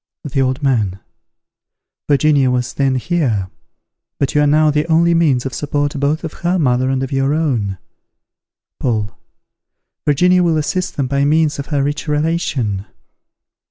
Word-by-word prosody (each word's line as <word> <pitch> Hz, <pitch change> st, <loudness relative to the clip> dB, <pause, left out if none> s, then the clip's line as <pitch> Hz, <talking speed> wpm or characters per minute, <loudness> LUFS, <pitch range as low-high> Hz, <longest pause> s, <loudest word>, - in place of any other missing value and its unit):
The 140 Hz, -2 st, -1 dB
Old 130 Hz, +2 st, -1 dB
Man. 110 Hz, -9 st, 0 dB, 1.1 s
Virginia 145 Hz, -2 st, +3 dB
was 125 Hz, 0 st, -1 dB
then 135 Hz, -2 st, +1 dB
here; 125 Hz, -, -1 dB, 0.7 s
but 140 Hz, -, -1 dB
you 150 Hz, -, +3 dB
are 145 Hz, -, +3 dB
now 155 Hz, +1 st, +4 dB
the 150 Hz, +2 st, 0 dB
only 170 Hz, +1 st, +3 dB
means 145 Hz, -7 st, +2 dB
of 135 Hz, -, -4 dB
support 145 Hz, 0 st, -1 dB
both 145 Hz, +4 st, 0 dB
of 160 Hz, -, -5 dB
her 175 Hz, +2 st, +1 dB
mother 130 Hz, -4 st, +1 dB
and 135 Hz, 0 st, 0 dB
of 135 Hz, -, -5 dB
your 135 Hz, +2 st, +1 dB
own. 120 Hz, -12 st, -1 dB, 1.0 s
Paul. 105 Hz, -7 st, -1 dB, 0.9 s
Virginia 180 Hz, +5 st, +3 dB
will 165 Hz, -2 st, +2 dB
assist 180 Hz, +4 st, -2 dB
them 140 Hz, -, 0 dB
by 140 Hz, +2 st, 0 dB
means 150 Hz, 0 st, +2 dB
of 140 Hz, -, -5 dB
her 145 Hz, -3 st, 0 dB
rich 145 Hz, +3 st, -3 dB
relation. 150 Hz, -, -1 dB
145 Hz, 155 wpm, -17 LUFS, 130-155 Hz, 1.1 s, now